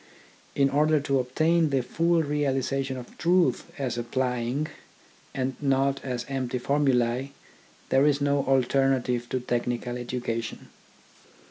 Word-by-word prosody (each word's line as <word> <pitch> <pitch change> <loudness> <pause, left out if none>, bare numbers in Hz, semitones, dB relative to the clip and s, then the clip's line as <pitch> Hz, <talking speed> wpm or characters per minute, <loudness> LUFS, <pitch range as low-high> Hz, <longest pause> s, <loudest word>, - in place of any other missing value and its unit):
In 140 -1 +3
order 150 +2 +3
to 140 -1 +1
obtain 155 +6 +2
the 135 -3 +1
full 165 +5 +1
realisation 135 -2 -1
of 125 -1 -10
truths 170 -7 +2
as 125 -4 -2
applying, 125 +3 -1 0.7
and 130 -1 -2
not 135 0 +1
as 125 -3 -3
empty 130 -2 -2
formulae, 130 -1 +1 0.6
there 135 +2 +4
is 145 -1 +2
no 140 -1 +1
alternative 130 -2 +1
to 130 - -1
technical 120 0 -2
education. 120 -2 -4
135 Hz, 120 wpm, -26 LUFS, 125-140 Hz, 0.7 s, there